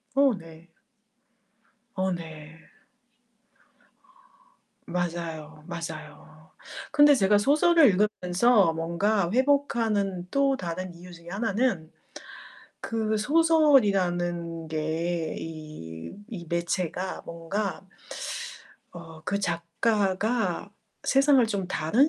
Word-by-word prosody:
어 275 -2 +5
네. 165 0 -14 1.3
어 190 0 0
네. 160 -2 -7 2.3
맞아요, 165 -3 -4
맞아요. 155 -2 -8 0.4
근데 290 0 +7
제가 205 -2 +4
소설을 305 +6 +5
읽으면서 195 -1 +3
뭔가 170 +4 0
회복하는 225 -9 +1
또 275 -1 +2
다른 180 +1 -5
이유 180 +1 -12
중에 170 0 -12
하나는 200 -4 -1 0.9
그 220 -1 -1
소설이라는 195 - +2
게 160 +1 -2
이 155 - -8 0.4
이 180 -8 -7
매체가 175 +2 -2
뭔가 190 +4 -4 1.1
어 165 -2 -11
그 200 +1 -1
작가가 195 +3 0 0.3
세상을 275 -2 +5
좀 200 -4 -2
다른 195 - +2
180 Hz, 170 characters per minute, -27 LUFS, 165-220 Hz, 2.3 s, 근데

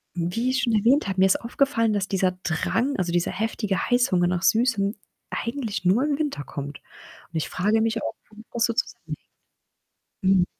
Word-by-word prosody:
Wie 180 +9 -1
ich 260 - 0
schon 235 - +1
erwähnt 230 +5 +3
habe, 190 -1 -2
mir 190 - +6
ist 190 - +3
aufgefallen, 235 -2 +1
dass 200 -1 0
dieser 190 -1 +2
Drang, 230 - 0
also, 180 -2 -1
dieser 175 0 +1
heftige 215 -2 -1
Heißhunger 245 -8 +3
nach 175 -1 0
Süßem 220 -3 +2 0.4
eigentlich 230 -5 -3
nur 200 +9 +4
im 290 -1 +1
Winter 290 - -2
kommt 145 0 -6
und - - -18
ich 155 - -2
frage 210 +4 +1
mich 225 0 0
auch, - - -2 0.2
womit 220 +1 -14
das 235 0 +2
so 235 - 0
zusammenhängt. - - -3 1.0
Mhm. 190 -2 +4
215 Hz, 180 wpm, -25 LUFS, 185-235 Hz, 1.0 s, mir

